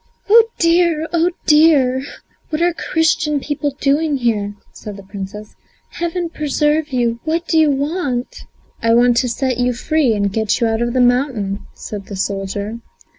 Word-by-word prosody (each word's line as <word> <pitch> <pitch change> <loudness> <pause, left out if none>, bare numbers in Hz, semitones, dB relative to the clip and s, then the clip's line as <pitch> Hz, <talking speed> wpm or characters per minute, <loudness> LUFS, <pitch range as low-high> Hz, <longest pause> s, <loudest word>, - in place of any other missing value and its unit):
"Oh, 450 +2 +7
dear; 335 -2 +2
oh, 340 +1 +3 0.2
dear! 300 -5 +4 0.5
what 305 - -2
are 345 +1 +2
Christian 320 -3 0
people 290 0 -3
doing 290 +1 +1
here?" 210 -5 -1 0.2
said 205 -2 -9
the 200 - -11
Princess. 200 +2 -8 0.4
"Heaven 345 0 -3
preserve 300 0 0
you! 235 -2 0
what 330 +2 -2
do 320 - +3
you 310 -1 +4
want?" 280 -3 -2 0.4
"I 230 0 +3
want 245 0 +4
to 250 +1 +1
set 255 +1 -1
you 245 0 +1
free 270 -1 +1
and 200 -1 -1
get 220 +1 0
you 235 - +2
out 225 0 0
of 240 0 -1
the 255 - +2
mountain," 245 -5 0
said 205 -2 -8
the 200 - -7
soldier. 200 +3 -3
260 Hz, 165 wpm, -18 LUFS, 225-315 Hz, 0.5 s, Oh